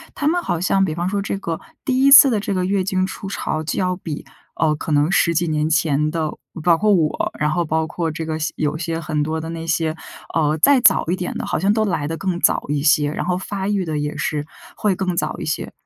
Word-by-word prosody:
她 290 - -1
们 350 +3 +2
好 170 - -2
像 195 +2 +2
比 160 - 0
方 175 +1 -2
说 200 0 -1
这 195 0 -3
个 165 -4 -4 0.3
第 260 0 +1
1 275 - +5
次 280 -1 +10
的 225 -4 +1
这 200 - -3
个 185 -1 0
月 195 0 0
经 185 0 0
初 195 +1 -7
潮 155 -5 -3
就 155 - -3
要 180 -1 0
比， 160 -5 -6 0.3
呃， 155 -2 +1
可 155 - -6
能 150 +4 +2
10 170 -3 +3
几 170 +1 0
年 155 0 0
前 155 -2 +1
的 160 -2 -1 0.3
包 170 -1 +4
括 210 +3 +3
我， 160 -5 0
然 150 0 +1
后 175 +2 0
包 160 +1 0
括 165 0 -3
这 160 +1 -5
个 155 0 -3
些 155 - -2
有 150 0 -1
些 165 0 -3
很 155 -2 -2
多 160 +1 -2
的 160 - -6
那 165 0 -6
些， 165 -1 0 0.4
呃， 155 -1 +1
再 280 -2 +6
早 - - +5
一 175 - +1
点 180 -1 -4
的， - - -4
好 - - -1
像 195 +3 +2
都 215 -1 +1
来 150 -7 -1
得 165 +1 -4
更 185 -2 -2
早 - - +3
一 145 -1 -1
些， 150 -1 +3
然 - - -3
后 180 0 0
发 195 +1 -4
育 200 -3 0
得 155 -2 -3
也 150 0 -3
是 150 -1 -2 0.3
会 205 -3 0
更 185 -1 -2
早 155 -1 -1
一 - - -5
些。 155 - -3
165 Hz, 275 characters per minute, -20 LUFS, 155-190 Hz, 0.4 s, 次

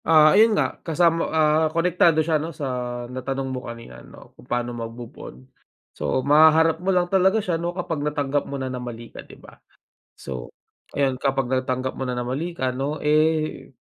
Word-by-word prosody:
Ah, 155 -1 +6
ayun 215 +1 +5
nga - - -1
kasama, 165 0 +1
ah, 155 0 +3
konektado 165 -1 +2
siya 155 -2 +1
no 160 - -4
sa 150 -3 -6 0.4
natanong 135 +2 -4
mo 125 -2 -6
kanina 115 - -10
no - - -16
kung - - -19
paano 120 0 -1
mag 115 -1 -5
move 120 0 -10
on, - - -9 0.6
so 130 - -2
mahaharap 160 +2 +5
mo 185 - -2
lang 180 -2 +3
talaga 190 +3 +3
siya 175 -6 -1
no 170 - -1
kapag 175 -4 -4
natanggap 145 -1 -1
mo 140 - -4
na 135 - -4
na 125 - -5
mali 120 -1 -8
ka - - -8
di - - -15
ba? - - -17 0.5
So 65 -3 -7 0.5
ayun 135 -2 0
kapag 135 -2 -1
natanggap 130 0 -2
mo 130 - -2
na 125 - -2
na 125 - -2
mali 150 +8 -4
ka 130 -5 -1
no, 140 +4 -4
eh, 155 +1 +1
150 Hz, 195 wpm, -23 LUFS, 130-165 Hz, 0.6 s, Ah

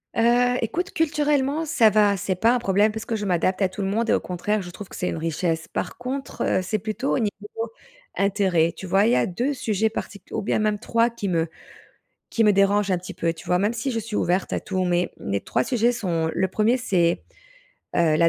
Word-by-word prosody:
Heu, 245 +2 +3
écoute, 345 - -2
culturellement, 295 -1 +1
ça 270 -9 +4
va, 205 -1 +3
c'est 185 +1 -1
pas 225 +6 +3
un 250 - +1
problème 205 0 +2
parce 220 +1 -6
que 225 - -2
je 210 - -3
m'adapte 185 +1 +1
à 190 - +3
tout 190 +2 -6
le 195 - -1
monde 225 +4 0
et - - +4
au - - +3
contraire, 205 +4 -2
je 180 - -8
trouve 195 +3 -9
que - - -10
c'est 180 - -1
une - - -2
richesse. 165 0 -2
Par - - -4
contre, 265 +3 -5 0.2
heu, - - -1
c'est 210 +3 -2
plutôt 220 +6 -2
au - - +1
niveau 215 +1 -4 0.5
intérêt. 190 -5 +2
Tu - - -8
vois? 195 +3 +3
Il 230 - +3
y - - +4
a - - +3
2 245 +11 -1
sujets 220 -4 0
particu 205 -2 -7
ou - - -1
bien 210 - 0
même 210 -1 +1
3 230 0 +2
qui 210 -4 -4
me 165 -1 +1 0.8
qui 225 - +1
me 210 - +6
dérange 200 0 +3
un 180 - +2
petit 185 - -9
peu. 165 0 0
Tu 160 - -13
vois? 180 - +2
Même 205 +4 +1
si 240 +3 -2
je 230 - -1
suis 220 -1 -4
ouverte 180 +2 0
à - - 0
tout, 185 -2 -2
mais 175 0 +1
mes 100 0 -2
3 - - -1
sujets 240 -1 +2
sont, 170 -8 -1
le 190 - +1
1er, 220 +6 +2
c'est, 175 -9 +1 0.7
heu, 160 -3 +3
la 165 +1 +5
205 Hz, 240 wpm, -24 LUFS, 185-230 Hz, 0.8 s, me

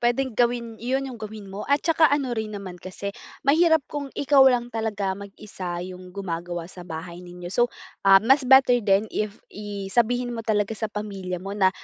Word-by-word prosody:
puwedeng 240 +2 +1
gawin 235 -1 0
'yon 260 +3 -1
'yong 250 -4 -8
gawin 215 -2 -8
mo. 200 +2 -6
At 285 0 +2
saka 320 -1 +5
ano 280 -3 0
rin 220 -2 -3
naman 185 -3 -8
kasi, 200 +2 -6 0.3
mahirap 320 +1 +4
kung 285 0 -5
ikaw 285 -1 +4
lang 245 -1 0
talaga 210 -4 -1
mag-isa 195 -2 -7
'yong 185 0 -9
gumagawa 175 -3 -4
sa 180 +1 -12
bahay 170 0 -7
ninyo. 175 0 -9
So, 240 +2 +3 0.4
ah, 195 - +10
mas 270 +4 +5
better 265 -2 +7
din 200 -1 +3
if 210 -1 -2 0.2
i 200 -1 -6
sabihin 245 +1 +1
mo 230 - -4
talaga 215 -2 0
sa 220 0 -3
pamilya 195 -4 -5
mo 195 +3 -6
na 200 -2 +4
215 Hz, 190 wpm, -25 LUFS, 195-245 Hz, 0.4 s, ah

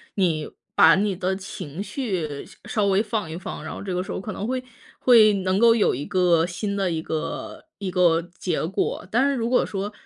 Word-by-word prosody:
你 165 -6 0 0.2
把 165 - +7
你 200 0 +1
的 190 +1 -1
情 185 -2 -7
绪 185 - -4 0.2
稍 210 -2 0
微 200 +2 +3
放 210 -5 -3
一 160 - -5
放， 180 - -6
然 - - -6
后 - - -7
这 190 -2 -4
个 180 - 0
时 195 - -8
候 - - -4
可 215 - -5
能 205 - -4
会 255 +1 -2 0.3
会 225 -4 +6
能 190 -1 0
够 230 0 +6
有 220 - +3
一 140 +4 -4
个 180 -4 +3
新 200 +3 -3
的 195 -2 +1
一 165 -2 -2
个 160 -1 -5
一 195 -2 -3
个 175 -2 +3 0.2
结 170 -4 -1
果， 180 - -2
但 245 +4 +3
是 280 - 0
如 235 -1 -1
果 250 - +3
说 200 +1 -4
190 Hz, 235 characters per minute, -24 LUFS, 170-210 Hz, 0.3 s, 把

